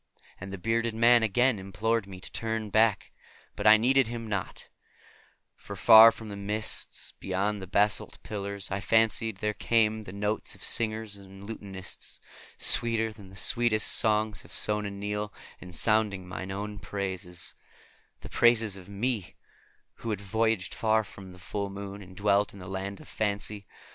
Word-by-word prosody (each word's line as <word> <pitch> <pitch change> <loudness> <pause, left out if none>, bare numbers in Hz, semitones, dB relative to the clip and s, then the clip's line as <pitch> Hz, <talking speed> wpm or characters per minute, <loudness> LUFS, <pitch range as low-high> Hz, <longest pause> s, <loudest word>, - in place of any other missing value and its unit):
And 95 +1 -8
the 100 - -5
bearded 115 +4 -1
man 120 +1 +5
again 115 +2 +2
implored 105 +3 -2
me 95 -2 -10
to - - -7
turn 110 -2 -3
back, 110 -1 +2 0.4
but 105 - -1
I 110 0 +9
heeded 130 +2 +3
him 115 -1 -6
not; 100 -4 -5 0.9
for - - -10
from 110 0 +7
the 100 - -6
mists 105 +2 -1
beyond 100 +2 -2
the 95 - -7
basalt 105 +3 +1
pillars 100 -2 -5
I 100 - -1
fancied 110 0 +2
there 105 +1 -2
came 110 -1 +1
the 90 - -8
notes 105 +2 -3
of - - -13
singer 110 -1 +1
and 100 -2 -10
lutanist; 95 -4 -7 0.4
sweeter 115 -2 +4
than 100 -3 -14
the 95 - -15
sweetest 110 +2 +3
songs 110 -1 +2
of - - -8
Sona 105 -1 +1
Nyl, 105 +1 -4 0.3
and 90 - -11
sounding 105 -2 +2
mine 95 +1 -6
own 100 +1 -5
praises; 95 -2 -5 0.7
the - - -10
praises 115 -4 +3
of 95 0 -13
me, 100 - -2 0.6
who 115 - -6
had 105 -3 -2
voyaged 110 -1 -1
far 110 -1 +1
under 95 -2 -11
the - - -14
full 100 +2 -4
moon 100 0 -8
and 95 -1 -14
dwelt 100 0 +2
in - - -12
the 90 - -10
Land 95 +1 -5
of - - -14
Fancy. 105 -2 -2
105 Hz, 165 wpm, -28 LUFS, 100-110 Hz, 0.9 s, I